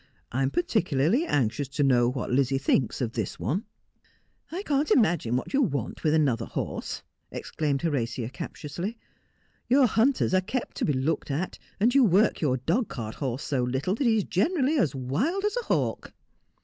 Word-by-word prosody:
' - - -36
I 130 - -1
am 135 - +2
particularly 175 - +1
anxious 130 +1 0
to 140 +2 -1
know 120 -3 +4
what 125 -1 -4
Lizzie 135 +1 +2
thinks 135 -3 +1
of 120 -3 -1
this 110 -5 -3
one.' 150 - -1 0.4
' - - -37
I 365 +4 -4
can't 290 -3 +1
imagine 175 - +3
what 130 - -3
you 280 - +3
want 140 - -2
with 155 0 +3
another 130 -7 +1
horse,' - - -4 0.3
ex - - -7
claimed 145 -2 -1
Horatia 120 -7 -1
captiously. 170 - -6 0.4
' - - -41
Your 265 +2 +6
hunters 240 -2 +2
are 185 - +4
kept 235 +6 -4
to - - 0
be 150 - +1
looked 135 +5 -1
at, 155 +7 -3 0.2
and 235 +5 +3
you 275 -1 +6
work 205 +1 +3
your 130 -5 +2
dog 170 - 0
cart 115 -5 -5
horse 130 -1 -2
so 135 -4 0
little 130 +8 -1
that 240 +4 0
he 225 -1 +4
is 210 - +1
generally 290 - +1
as 150 - +1
wild 220 - -1
as 420 - 0
a - - -2
hawk.' - - -1
150 Hz, 195 wpm, -27 LUFS, -, 0.4 s, Your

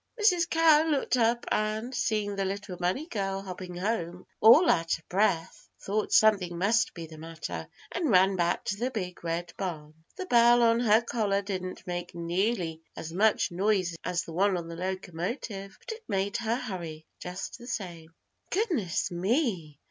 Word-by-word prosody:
Mrs. 365 -5 +3
Cow 325 -2 +5
looked 285 -4 +1
up 235 0 +2
and, 215 +4 -1
seeing 210 -4 0
the 195 - -1
little 195 0 -4
bunny 180 - -1
girl 195 - -3
hopping 185 -1 -7
home 180 -2 -2
all 265 - +8
out 165 - +2
of 165 - -24
breath, 180 -4 0
thought 210 +2 -2
something 195 -6 +4
must 210 +6 +2
be 170 -2 -6
the 160 -1 -12
matter 155 - -6 0.2
and 345 -4 -1
ran 190 -1 +5
back 175 -1 0
to 200 - -2
the 245 +4 -1
Big 180 -9 -5
Red 170 +1 -3
Barn. 155 -6 -5 0.2
The 375 - -5
bell 240 -4 +5
on 230 0 +4
her 225 -2 +4
collar 205 -4 0
didn't 185 -2 -5
make 175 0 -5
nearly 170 -1 -1
as 165 0 -7
much 205 +1 +2
noise 185 -1 +1
as 180 0 -1
the 165 - -9
one 190 +2 +2
on 170 -1 -5
the 165 - -6
locomotive, 190 - -4
but - - -8
it 445 +1 -8
made 195 +1 0
her 230 -1 0
hurry, 170 -10 -6
just 180 +7 -6
the 240 - -11
same. 175 -8 -5 0.4
"Goodness 330 - 0
me! 185 - -1
195 Hz, 170 wpm, -28 LUFS, 175-230 Hz, 0.4 s, all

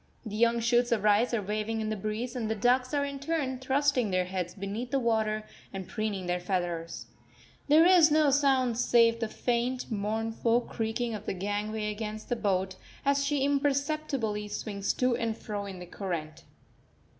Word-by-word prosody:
The 210 -1 -5
young 235 +1 +3
shoots 240 +1 +2
of 220 -3 +1
rice 210 +3 +4
are 230 -4 0
waving 215 +2 -2
in 215 -1 -2
the - - 0
breeze, 215 +5 -4
and 225 -3 -2
the 220 - 0
ducks 250 +4 +2
are 285 -1 +1
in 280 -1 -5
turn 280 -3 -2
thrusting 265 -3 +1
their 185 -1 +1
heads 180 -1 -4
beneath 205 +5 -4
the 275 - +1
water 220 -3 0 0.3
and 190 -2 -6
preening 215 -4 -3
their 180 0 0
feathers. 175 -2 -3 0.6
There 310 +3 +6
is 350 -3 +7
no 305 -1 +4
sound 265 -4 +2
save 230 -1 +4
the 225 - -1
faint, 245 +3 -2
mournful 225 +3 0
creaking 230 0 -3
of 210 0 -7
the - - -1
gangway 210 +2 -2
against 215 0 -6
the 245 - +1
boat, 190 -4 -1 0.3
as 280 0 +3
she 280 -1 0
imperceptibly 280 -6 0
swings 200 -1 -2
to 250 -1 +1
and 225 -1 -2
fro 205 -2 -5
in 190 -2 -7
the 180 - -8
current. 170 -4 -5
225 Hz, 180 wpm, -29 LUFS, 205-255 Hz, 0.6 s, is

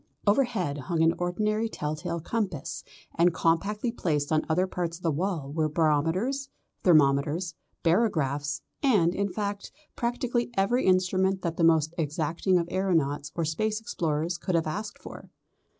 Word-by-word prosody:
Overhead 205 - +1
hung 165 +3 0
an 165 +1 +4
ordinary 215 +5 0
tell 150 -7 -3
tale 170 +2 -4
compass, 185 - -3 0.3
and 175 +1 +4
compactly 205 +9 +1
placed 150 -10 -1
on 155 0 +3
other 180 +4 +2
parts 175 -3 -3
of 180 - -21
the 165 - +2
wall 160 -3 -2
were 155 -1 +1
barometers, 165 - +1 0.3
thermometers, 155 +1 +3 0.3
barographs, 155 - +1 0.2
and, 200 - +3
in 200 0 -1
fact, 200 +1 -4 0.2
practically 240 0 -1
every 195 +6 +2
instrument 185 +1 +2
that 170 -2 -2
the 170 - +1
most 160 -1 +4
exacting 160 +4 0
of 170 -1 0
aeronauts 160 -7 0
or 170 - 0
Space 215 +7 -1
explorers 170 -5 -2
could 185 - -1
have 165 - +2
asked 205 +7 -4
for. - - -11
175 Hz, 150 wpm, -27 LUFS, 155-200 Hz, 0.3 s, an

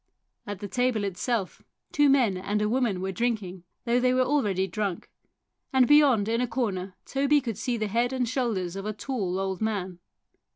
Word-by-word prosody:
At 205 -1 -6
the 205 - -4
table 245 0 0
itself 200 +1 -2 0.3
two 290 -1 +4
men 250 -8 +3
and 200 +3 -2
a 210 - +1
woman 225 -5 0
were 190 0 -2
drinking, 190 -4 -2 0.2
though 240 +1 +2
they 255 0 +2
were 255 - +4
already 210 -9 +1
drunk, 195 -1 -4 0.6
and 260 -2 +4
beyond 280 -8 +5
in 230 +2 +1
a 250 - 0
corner 200 -6 -2
Toby 280 +2 +2
could 235 -5 -4
see 245 0 -1
the 215 - -1
head 235 +4 +1
and 255 -2 -1
shoulders 220 -8 -1
of 195 +1 -5
a 215 - -2
tall 205 -6 -3
old 190 0 -3
man. 190 -5 -2
220 Hz, 190 wpm, -27 LUFS, 195-250 Hz, 0.6 s, beyond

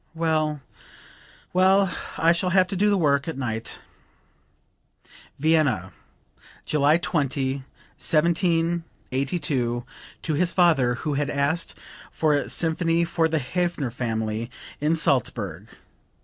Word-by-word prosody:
Well, 155 -3 0 0.9
well; 190 +1 +4 0.2
I 165 +1 +4
shall 180 +2 -1
have 185 +1 +4
to 195 - -3
do 205 +3 +3
the 200 - +3
work 140 -4 +2
at 160 - -4
night." 115 -4 -4 1.6
(Vienna, 140 - +1 0.7
July 150 +1 +3
20, 140 -5 -1 0.4
1782, 160 -6 0 0.4
to 160 - -1
his 170 +4 +1
father 155 -9 +3
who 150 +4 -3
had 145 0 -1
asked 145 +4 0 0.4
for 155 -2 +1
a 145 - 0
symphony 165 0 +2
for 165 -1 +1
the 160 0 0
Hafner 160 -2 -2
family 110 -1 -3 0.3
in 150 +3 +1
Salzburg. 115 - 0
155 Hz, 110 wpm, -24 LUFS, 130-170 Hz, 1.6 s, well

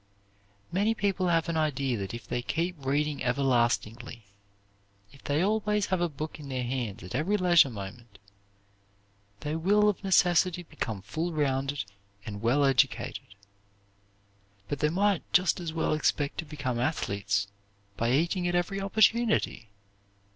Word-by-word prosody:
Many 205 +5 +1
people 195 -3 0
have 165 -1 +2
an 165 -1 -1
idea 140 -5 0
that 95 -2 -4
if 120 +1 -8
they 120 - -2
keep 170 +7 -2
reading 145 +2 0
everlastingly, 120 -3 0 0.9
if 140 - -18
they 145 +4 +1
always 210 0 +1
have 185 - +1
a 175 - +1
book 155 +2 -6
in 145 -2 -9
their 130 -1 -2
hands 120 -5 -3
at 90 - -8
every 165 +11 +1
leisure 175 -6 +5
moment, 105 0 -9 1.2
they 150 +1 -3
will, 205 +6 +3
of 205 - -3
necessity, 180 -2 +3
become 110 - -5
full 165 - -3
rounded 140 -2 0 0.4
and 100 -1 -6
well 130 +5 +3
educated. 125 -6 0 1.3
But 145 - -3
they 150 - +2
might 195 +2 +2
just 180 +1 +3
as 170 -2 -4
well 160 -1 0
expect 145 -1 0
to 165 - -3
become 140 -5 -3
athletes 100 -7 -1 0.5
by 115 +3 0
eating 175 +6 +1
at 175 - 0
every 195 +3 -1
opportunity. 215 - +2
150 Hz, 145 wpm, -28 LUFS, 125-180 Hz, 1.3 s, leisure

